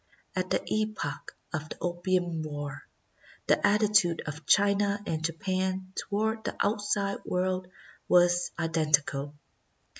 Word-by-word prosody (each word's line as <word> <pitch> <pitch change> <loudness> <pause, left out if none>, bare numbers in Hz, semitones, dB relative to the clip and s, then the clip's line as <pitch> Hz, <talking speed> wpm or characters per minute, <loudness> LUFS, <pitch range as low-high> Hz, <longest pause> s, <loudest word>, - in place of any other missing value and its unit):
^^ - - -42 0.3
At 185 0 -1
the - - +1
epoch 215 -10 -3 0.2
of 155 0 -3
the - - -7
Opium 175 -1 0
War, 145 -2 -6 0.6
the - - +2
attitude 205 -5 +3
of 155 0 -7
China 200 0 +4
and 160 -4 -2
Japan 185 +3 -2
toward 220 +2 -1
the - - -3
outside 205 -1 0
world 185 0 -1 0.4
was 175 0 +4
identical. 150 -3 +1
180 Hz, 120 wpm, -29 LUFS, 160-200 Hz, 0.6 s, China